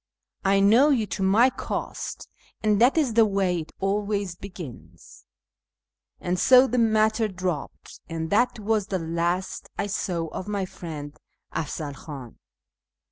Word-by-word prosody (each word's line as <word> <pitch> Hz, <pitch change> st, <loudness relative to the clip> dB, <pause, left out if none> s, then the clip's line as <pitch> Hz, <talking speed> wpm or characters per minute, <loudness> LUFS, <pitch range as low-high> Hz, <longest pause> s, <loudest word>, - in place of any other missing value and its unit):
I 195 Hz, 0 st, +3 dB
know 230 Hz, +9 st, +6 dB
you 245 Hz, -7 st, +2 dB
to 205 Hz, -, -5 dB
my 215 Hz, +7 st, +5 dB
cost, -, -, -5 dB, 0.4 s
and 210 Hz, 0 st, +3 dB
that 255 Hz, +6 st, +5 dB
is 280 Hz, -8 st, +2 dB
the 230 Hz, 0 st, +6 dB
way 190 Hz, -3 st, +1 dB
it 160 Hz, -, -8 dB
always 200 Hz, -1 st, -1 dB
begins." 175 Hz, -, -11 dB, 0.9 s
And 180 Hz, +1 st, -1 dB
so 255 Hz, +5 st, +7 dB
the 250 Hz, -1 st, 0 dB
matter 220 Hz, 0 st, +3 dB
dropped, 180 Hz, -6 st, -5 dB
and 160 Hz, -1 st, -4 dB
that 240 Hz, +5 st, +3 dB
was 215 Hz, -1 st, 0 dB
the 190 Hz, -, -1 dB
last 170 Hz, +2 st, -2 dB
I -, -, 0 dB
saw 180 Hz, -4 st, -2 dB
of 185 Hz, -, -6 dB
my 200 Hz, -2 st, -1 dB
friend 155 Hz, -5 st, -8 dB, 0.4 s
Afzal 150 Hz, -1 st, -3 dB
Khtin. 135 Hz, -4 st, -9 dB
195 Hz, 140 wpm, -25 LUFS, 170-215 Hz, 0.9 s, so